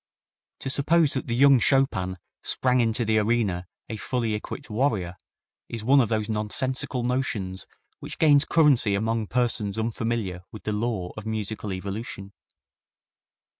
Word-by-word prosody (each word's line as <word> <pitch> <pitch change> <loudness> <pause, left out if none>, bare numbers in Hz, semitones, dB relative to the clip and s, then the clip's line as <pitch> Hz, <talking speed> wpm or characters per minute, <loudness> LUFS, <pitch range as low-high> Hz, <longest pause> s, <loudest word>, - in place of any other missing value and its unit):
To 135 - -3
suppose 155 +2 +3
that 130 - -2
the 120 - -1
young 135 0 +6
Chopin 105 -10 +1 0.2
sprang 125 -1 +1
into 115 0 +1
the 110 0 +3
arena 105 -5 0 0.2
a 110 - -5
fully 115 0 -2
equipped 105 - -6
warrior 105 -7 -1 0.5
is 115 -2 -5
one 135 +4 +5
of 115 - 0
those 110 -2 -1
nonsensical 120 +4 -1
notions 110 -7 -2 0.3
which - - -7
gains 145 -3 +5
currency 140 -11 +4
among 110 +1 -1
persons 110 -4 0
unfamiliar 110 -4 -2
with 110 - -10
the 105 - -2
law 105 -5 -2
of 110 0 -8
musical 110 -1 -3
evolution. 100 +1 -6
110 Hz, 140 wpm, -25 LUFS, 105-125 Hz, 0.5 s, young